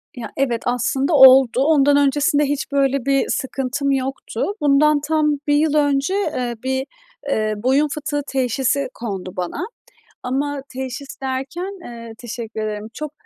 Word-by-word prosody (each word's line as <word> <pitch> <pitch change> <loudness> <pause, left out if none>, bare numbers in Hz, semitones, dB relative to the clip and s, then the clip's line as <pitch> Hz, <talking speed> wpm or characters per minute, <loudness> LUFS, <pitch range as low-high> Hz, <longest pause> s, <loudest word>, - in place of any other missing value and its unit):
Ya, 245 - -7
evet 245 -4 0
aslında 265 +5 0
oldu. 265 -3 +7
Ondan 285 -2 +4
öncesinde 285 +1 +2
hiç 285 0 -3
böyle 275 -2 +1
bir 275 -1 +2
sıkıntım 270 +1 -1
yoktu. 265 -3 -2 0.2
Bundan 295 +1 +4
tam 300 0 +1
1 290 - +3
yıl 300 0 +2
önce, 285 +3 +2
eee, 255 -11 -2
bir, 265 0 -1 0.4
eee, 215 -4 0
boyun 265 +7 +2
fıtığı 290 0 -3
teşhisi 265 +1 0
kondu 195 -5 -6
bana 180 - -3 0.6
ama 280 +3 -2
teşhis 265 +2 -6
derken, 275 +9 -4
eee, 230 -1 -9
teşekkür 235 -2 -6
ederim, 210 +1 -5
çok 305 +2 -6
270 Hz, 140 wpm, -20 LUFS, 250-290 Hz, 0.6 s, oldu